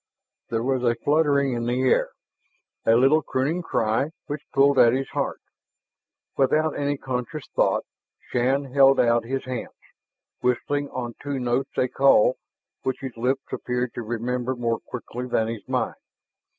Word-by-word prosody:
There 115 0 -1
was 130 0 0
a 120 -1 +3
fluttering 145 -2 +2
in 120 0 -2
the 125 +2 0
air, 130 - +3 0.8
a 115 - +6
little 135 +6 +5
crooning 145 +6 -1
cry 115 -2 0 0.2
which 145 +1 -5
pulled 140 0 +4
at 115 0 +6
his 135 +1 -1
heart. - - -2 1.0
Without 155 +3 +2
any 145 0 -1
conscious 130 +3 -4
thought, - - +2 0.5
Shann 130 +2 0
held 135 -1 +6
out 115 -1 +3
his 135 +2 -3
hands, 130 -2 -5 0.6
whistling 145 +3 0
on 120 -2 -5
two 145 -1 -3
notes 125 +3 -1
a 130 - +3
call 130 -2 +4 0.4
which 130 0 -3
his 130 -3 -6
lips 130 +4 0
appeared 125 0 -2
to - - -5
remember 120 +3 -2
more 115 -2 -1
quickly 125 0 -7
than 110 -2 +1
his 115 -2 -6
mind. - - 0
130 Hz, 150 wpm, -24 LUFS, 120-140 Hz, 1.0 s, a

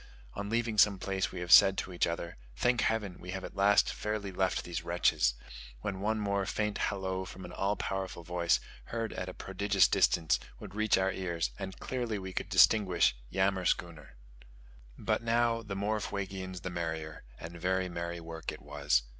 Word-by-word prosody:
On 100 0 -5
leaving 115 -1 0
some 100 -1 +6
place 95 +1 -2
we 90 - -6
have 90 -1 -4
said 95 +2 +9
to 95 - -3
each 85 - +1
other, 85 0 -4 0.2
"Thank 125 - +2
heaven, 105 -5 -1
we 90 - -10
have 95 0 -4
at - - -8
last 100 +1 +4
fairly 105 -2 -3
left 95 0 0
these 85 -1 -4
wretches!" 85 -8 +2 0.5
when 100 -2 -3
one 110 +2 0
more 100 -2 0
faint 105 0 -1
hallo 95 -1 -3
from 95 0 -9
an - - -9
all 100 +2 0
powerful 95 -4 -4
voice, 85 0 +1 0.3
heard 115 -1 -3
at 95 - -4
a - - -7
prodigious 95 0 +2
distance, 80 0 +3 0.2
would - - -9
reach 110 0 +2
our 95 0 +2
ears, 85 -3 -2
and 95 -1 -6
clearly 120 -4 -3 0.2
could - - -2
we - - -21
distinguish 95 - +5 0.2
"yammerschooner." 90 -6 0 0.8
But - - 0
now, 115 0 +2
the 105 -3 -6
more 105 +2 0
Fuegians 95 -3 -5
the 90 - -3
merrier; 80 -2 -4 0.2
and 85 +1 -9
very 95 +1 +1
merry 85 0 -4
work 80 -1 -6
it - - -11
was. 70 -4 +1
95 Hz, 180 wpm, -31 LUFS, 85-100 Hz, 0.8 s, said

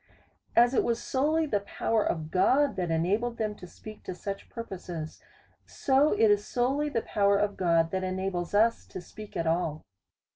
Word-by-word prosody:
As 240 +2 +5
it - - +3
was 235 -1 0
solely 315 +1 +1
the 215 -9 0
power 210 +2 -1
of 155 -2 -3
God 265 +10 +3
that 180 -2 -2
enabled 205 +9 0
them 215 -1 -1
to 180 - -10
speak 215 +4 -12
to 185 - -5
such 195 +1 -6
purposes, 180 -8 -7 0.5
so 275 +3 +2
it 220 -2 +4
is 205 0 +2
solely 270 +7 0
the 230 -5 -1
pow 200 -1 +1
er 200 - +4
of 205 0 0
God 165 -2 +2
that 190 0 -2
enables 185 -1 -2
us 230 +2 +2
to - - -7
speak 210 +4 -10
at 165 - -1
all. 160 -2 -1
205 Hz, 185 wpm, -28 LUFS, 180-235 Hz, 0.5 s, As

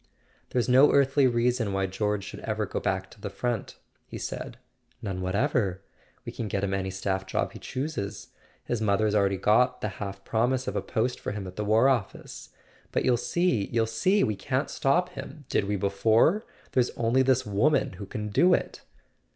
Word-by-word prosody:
"There's 125 -2 0
no 130 +3 +6
earthly 140 0 +4
reason 120 -3 +1
why 95 0 +1
George 105 +1 -1
should 95 - -8
ever 110 -1 -2
go - - -3
back 95 -1 -2
to 105 - -16
the 100 - -4
front," 120 +1 -3 0.3
he - - -7
said. - - -6 0.4
"None 95 -3 -4
whatever. 100 -1 0 0.4
We - - -5
can 115 - -4
get 100 -1 -2
him 100 -1 0
any 95 -1 -1
staff 95 0 -2
job - - -1
he - - -10
chooses. 115 -8 -4 0.3
His 120 -2 -2
mother's 105 0 +2
already 100 -2 +2
got 110 +7 +3
the 105 - -1
half 100 -1 -6
promise 125 +3 0
of - - -2
a - - 0
post 120 +3 -1
for - - -4
him 100 -2 -5
at 90 0 -8
the 105 - -2
War 110 +5 +4
Office. 125 -7 -2 0.4
But - - 0
you'll 125 - +4
see, 125 - 0
you'll 115 -1 +1
see! 185 - +2
We 105 - 0
can't 130 +8 -2
stop 175 +6 +1
him. 155 -4 -9
Did - - +1
we 105 +1 -1
before? 110 - +2 0.3
There's 125 -2 +2
only 120 +3 +2
this 130 -1 +2
woman 130 +8 +2
who 100 - -6
can 105 +1 -4
do 180 - +5
it! - - -5
110 Hz, 190 wpm, -27 LUFS, 100-130 Hz, 0.4 s, no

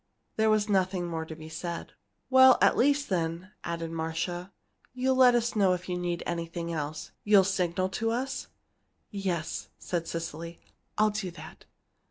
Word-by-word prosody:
There 220 0 +3
was 215 -1 +3
nothing 185 -3 +1
more 165 -2 -3
to 160 - -8
be 155 0 -10
said. 170 +1 -5 0.4
"At 260 0 +7
least, 285 +2 +3
then," 170 +1 -2
added 165 -1 -4
Marcia, 165 +3 -3 0.4
"you'll 260 +1 +2
let 255 -1 +6
us 240 0 0
know 195 -3 +4
if 180 0 -4
you 180 - -2
need 175 -1 -2
anything 170 0 -3
else 155 0 -4
you'll 205 -2 +6
signal 185 -1 0
to 225 +4 -1
us?" 260 +3 -2 0.6
"Yes," 185 -5 -3
said 170 -2 -3
Cecily, 165 0 -5 0.4
"I'll 215 0 +4
do 205 -3 -3
that." 170 - -12
180 Hz, 155 wpm, -29 LUFS, 170-215 Hz, 0.6 s, At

